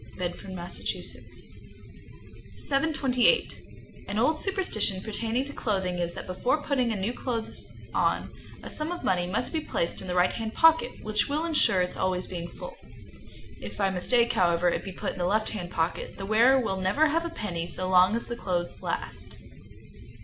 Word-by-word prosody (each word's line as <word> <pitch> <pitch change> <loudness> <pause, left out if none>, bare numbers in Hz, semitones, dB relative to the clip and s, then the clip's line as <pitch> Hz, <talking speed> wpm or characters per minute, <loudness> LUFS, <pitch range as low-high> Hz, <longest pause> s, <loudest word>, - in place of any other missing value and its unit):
Bedford, 180 +1 -4
Mass. 175 -1 -5
728. 275 - -2 0.5
An 205 - -3
old 305 +8 +2
superstition 370 - 0
pertaining 225 +4 -1
to 285 - -8
clothing 190 -8 -1
is, 170 0 -1
that - - -6
before 245 +11 0
putting 255 -5 +1
on 210 - -2
new 205 +6 -1
clothes 235 -3 -4 0.3
a - - +2 0.4
sum 305 +2 0
of 355 - -5
money 175 -1 +1
must 205 - -1
be 320 - +1
placed 170 - -2
in 190 - -7
the 180 - -2
right 180 0 +4
hand 225 -1 -4
pocket, 325 -6 +4
which 215 +3 0
will 300 +3 0
insure 295 - +3
its 180 - -4
always 185 -1 0
being 175 -2 -5
full. - - -9 0.9
If - - -7
by 195 -2 +2
mistake, 235 +6 +2
however, 175 -1 +3
it - - -1
be 195 - -6
put - - -3
in 195 - -9
the 175 - +1
left 215 +4 +1
hand 180 -5 -5
pocket, 165 -1 -2
the 195 - -5
wearer 235 +6 +5
will 195 -6 -1
never 195 +12 +3
have 330 +2 +1
a 340 - -3
penny 180 - -4
so 185 +1 -3
long 185 +3 +5
as 235 - -2
the 235 - -4
clothes 180 -6 -2
last. - - -4
215 Hz, 180 wpm, -28 LUFS, 180-265 Hz, 0.9 s, wearer